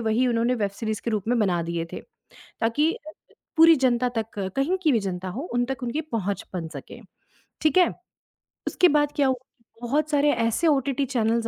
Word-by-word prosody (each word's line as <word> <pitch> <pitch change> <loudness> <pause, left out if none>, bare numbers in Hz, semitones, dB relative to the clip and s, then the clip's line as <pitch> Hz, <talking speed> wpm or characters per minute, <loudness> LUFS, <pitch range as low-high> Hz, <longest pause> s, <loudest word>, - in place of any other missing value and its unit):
वही 225 +3 +1
उन्होंने 240 +1 +1
web 205 -4 -1
series 220 -2 -2
के 235 - -2
रूप 215 -1 -2
में 245 0 +2
बना 180 -6 +1
दिए 170 0 -3
थे - - -5 0.6
ताकि 290 +9 +2 0.6
पूरी 330 0 +8
जनता 250 -2 +2
तक, 220 - 0 0.3
कहीं 295 +8 +1
की 310 - +4
भी 230 - +3
जनता 185 -2 -4
हो, 230 +9 -5
उन 245 0 +2
तक 265 0 -5
उनकी 245 +6 -2
पहुँच 220 - -3
बन 170 -3 -3
सके, 150 - -10 0.6
ठीक 310 +2 +2
है। 360 -2 +6 0.8
उसके 360 - +4
बाद 295 0 +2
क्या 280 -2 +3
हुआ? 260 - +2 0.5
बहुत 295 +6 0
सारे 290 0 +3
ऐसे 230 +8 +1
ओटीटी 275 -1 +1
चैनल्स 230 -2 0
245 Hz, 190 wpm, -25 LUFS, 220-285 Hz, 0.8 s, पूरी